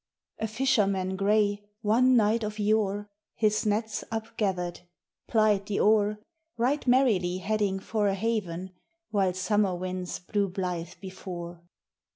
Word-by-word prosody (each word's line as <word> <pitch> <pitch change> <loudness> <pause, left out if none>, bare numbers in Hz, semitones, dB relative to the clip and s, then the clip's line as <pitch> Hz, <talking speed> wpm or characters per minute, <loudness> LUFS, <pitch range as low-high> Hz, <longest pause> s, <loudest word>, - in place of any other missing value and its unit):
A 220 - -1
FISHERMAN 205 -6 +1
gray, 205 +1 +2 0.2
one 250 +5 +4
night 220 +1 +3
of 215 0 -4
yore, 205 -1 +1 0.3
His 215 -1 +1
nets 215 +1 -1
upgathered, 200 -6 -2 0.5
plied 215 -3 +2
the 205 - -1
oar, 210 0 +3 0.4
Right 260 +5 0
merrily 215 -9 +3
heading 200 0 0
for 210 +1 0
a 195 - +1
haven, 190 -4 -2 0.4
While 190 -3 +1
summer 195 0 +1
winds 185 0 -4
blew 200 +2 -1
blithe 180 -2 -3
before. 175 -3 -7
205 Hz, 125 wpm, -28 LUFS, 185-220 Hz, 0.5 s, one